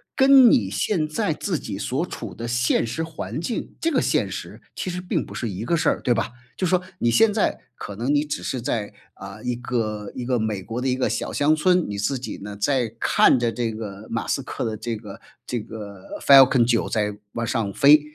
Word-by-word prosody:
跟 265 -2 +7
你 100 -4 +3
现 155 - 0
在 155 +1 -1
自 170 +2 -2
己 100 -2 -6
所 130 - -1
处 - - -7
的 115 - -5
现 120 0 +1
实 160 +8 -3
环 160 -1 -5
境 225 +7 -4
这 330 - +1
个 270 - +2
现 - - +1
实， - - -7
其 185 - -3
实 180 +1 -4
并 180 - -1
不 - - -11
是 115 - -3
一 100 +3 -5
个 170 - +1
事 - - +2
儿， - - -1
对 125 - +2
吧？ 120 - -1 0.3
就 185 - 0
说 180 +1 +2 0.2
你 120 - +2
现 215 - +4
在 210 - 0 0.2
可 100 - -7
能 125 +7 0
你 145 +1 +3
只 150 - -4
是 130 - -2
在， 110 -3 -2 0.2
呃， - - -10
一 125 -1 -1
个 110 -4 -3
一 125 - -4
个 125 -1 +1
美 110 -3 -2
国 115 +5 -4
的 135 - -1
一 130 - +2
个 130 - 0
小 - - -2
乡 150 +2 +3
村， 180 +2 +3
你 100 - -4
自 105 +7 0
己 130 - -6
呢， 105 0 -7
在 120 0 0
看 130 - +4
着 120 -1 +1
这 115 -2 -2
个 110 -1 -7
马 115 - -3
斯 135 - 0
克 125 - -4
的 110 - -2
这 115 +1 -4
个 105 -2 -11 0.2
这 120 - -2
个 100 -3 -9
Falcon 135 -3 +7
9 120 -2 +1
在 105 -2 0 0.2
往 115 0 -2
上 110 -4 -1
飞， 145 +2 +7
120 Hz, 260 characters per minute, -23 LUFS, 110-150 Hz, 0.3 s, 跟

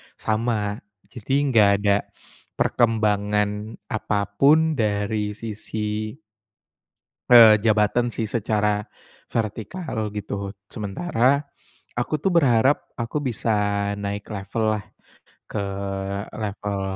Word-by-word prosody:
sama, 110 -2 -1 0.3
jadi 120 +3 -5 0.2
nggak 110 -4 +6
ada 100 -1 +4 0.6
perkembangan 105 -3 +2 0.4
apa 105 -1 0 0.2
pun 155 +2 +5
dari 105 0 0
sisi 110 +1 -4 1.1
eee, 115 -3 +9
jabatan 110 +2 +2
sih - - -2
secara 105 -2 0 0.4
vertikal 110 - -3
gitu, 100 -1 -4 0.2
sementara 125 - +1 0.6
aku 120 +5 -1
tuh 195 - +2
berharap 135 -5 +3
aku 120 +5 -2
bisa 125 -5 -2 0.5
naik 100 +1 -5
level-lah 105 +1 -1 0.6
ke 105 - -3 0.7
level, 105 -2 -3
110 Hz, 90 wpm, -23 LUFS, 105-120 Hz, 1.1 s, eee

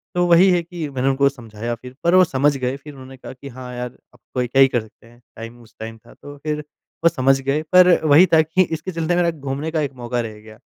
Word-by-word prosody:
तो 175 0 +2
वही 175 +3 +6
है 175 -1 +2
कि 170 -2 -6
मैंने 135 -1 -2
उनको 140 +1 +2
समझाया 120 -3 -6
फिर 125 +2 -13
पर 170 +2 +3
वो 185 - +7
समझ 145 -2 +1
गए 130 0 -2
फिर 145 +1 -12
उन्होंने 130 -1 -12
कहा 130 - -10
कि, 135 +2 -12
"हाँ 125 0 -9
यार, 125 0 -4 0.2
अब 120 - -22
कोई 125 -1 -1
क्या 135 +2 +3
ही 135 - +8
कर 120 -3 -1
सकते 110 +1 -18
हैं? 120 +1 -20 0.2
टाइम 115 +2 -10
उस 115 -1 -20
टाइम 115 0 -7
था।" - - -19
तो 145 0 -12
फिर 150 -1 -2 0.4
वो 170 - +6
समझ 135 -3 +2
गए 140 +3 -1
पर 180 0 +7 0.2
वही 155 +4 +7
था 160 - +7
कि 160 +4 0
इसके 165 +2 -5
चलते 165 0 -1
मेरा 175 -1 +2
घूमने 140 +1 -5
का 160 - -1
एक 140 -2 -3
मौका 120 0 -3
रह 110 -2 -8
गया। 110 0 -15
135 Hz, 265 wpm, -20 LUFS, 125-160 Hz, 0.4 s, ही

